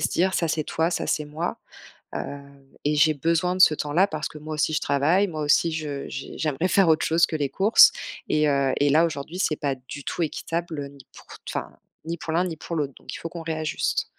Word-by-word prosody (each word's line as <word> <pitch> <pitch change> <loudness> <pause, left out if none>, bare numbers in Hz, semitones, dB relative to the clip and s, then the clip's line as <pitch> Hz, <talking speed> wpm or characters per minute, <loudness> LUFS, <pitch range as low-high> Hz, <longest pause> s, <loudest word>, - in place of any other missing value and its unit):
se 155 - +1
dire: 185 +2 +1
«Ça 165 - +1
c'est 155 0 -1
toi, 165 +3 0
ça - - -2
c'est 150 -1 -1
moi, 155 +4 -4 0.6
heu, - - -1 0.7
et 150 - +2
j'ai 155 +1 +5
besoin 165 +4 +1
de - - -5
ce 155 - +8
temps-là 150 +6 +2
parce 155 -4 -3
que 150 - -11
moi 155 +1 -7
aussi 155 +1 0
je 155 - +2
travaille, 160 +8 +2
moi 155 -4 -5
aussi 150 +3 +3
je 145 -3 -4
je 135 - -6
j'aimerais 155 +3 0
faire 190 0 +4
autre 155 0 +3
chose 165 +2 +4
que 160 - -5
les 145 -3 -1
courses 205 +4 +6 0.4
et 150 0 +3
heu, 140 -1 +2
et 145 - +3
là 160 +3 +5
aujourd'hui 160 +3 -5
c'est 155 -5 +1
pas 140 -2 -1
du 130 +2 -10
tout - - -3
équitable 160 -2 -3
ni 140 -2 -16
pour - - -14
t - - -53
enfin - - -5 0.3
ni 165 - -3
pour 160 - -5
l'un 175 +3 +2
ni 165 -3 -5
pour 170 - -6
l'autre, 145 -4 -2
donc - - -10
il - - -5
faut - - -6
qu'on 170 0 -7
réajuste». 155 -1 -1
155 Hz, 240 wpm, -24 LUFS, 145-170 Hz, 0.7 s, ce